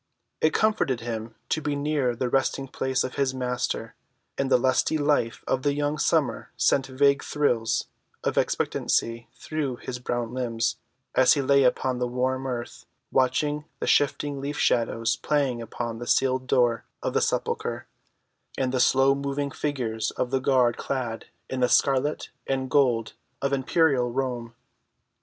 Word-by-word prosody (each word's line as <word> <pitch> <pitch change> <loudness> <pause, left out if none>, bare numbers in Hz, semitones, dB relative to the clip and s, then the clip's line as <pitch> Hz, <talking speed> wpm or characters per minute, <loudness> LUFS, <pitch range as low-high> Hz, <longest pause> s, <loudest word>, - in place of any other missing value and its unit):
It 155 - +4
comforted 210 - +1
him 115 -1 -5
to 155 - 0
be 145 -1 -1
near 140 -4 0
the 125 +2 -1
resting‐place 130 0 0
of 130 - -5
his 135 -2 +1
Master; 125 -2 -2 0.4
and 135 -1 -1
the 130 - +6
lusty 130 +5 +2
life 145 -6 +1
of 130 - 0
the 145 +1 +1
young 145 +1 -1
summer - - +1
sent 135 -1 +2
vague 140 +1 +3
thrills 120 -7 0 0.4
of - - 0
expectancy 115 0 0
through 145 -2 -3
his 125 +1 -6
brown 120 -1 -3
limbs, 120 -3 -1 0.4
as 130 -1 +6
he 145 - +1
lay 140 +1 +4
upon 125 0 +1
the 125 - 0
warm 130 +2 -1
earth 120 -2 -5 0.2
watching 145 +4 +1
the - - -2
shifting 145 -1 +1
leaf‐shadows 115 -5 0
playing 140 -5 0
upon 115 0 -5
the 120 - -6
sealed 130 -1 +2
door 120 -3 +2 0.2
of - - -1
the - - +2
sepulchre, - - -1 0.7
and 130 -1 0
the 130 - 0
slow‐moving 140 +2 +2
figures 115 -7 -2
of 125 - -3
the 135 -1 +1
guard 130 -3 +3
clad 125 -4 -3 0.2
in 130 - -4
the 125 -1 +3
scarlet 140 +2 +2 0.2
and 130 -1 -1
gold 120 -6 +2 0.3
of 140 0 -1
imperial 135 -2 +2
Rome. 120 -3 -3
130 Hz, 150 wpm, -26 LUFS, 120-140 Hz, 0.7 s, the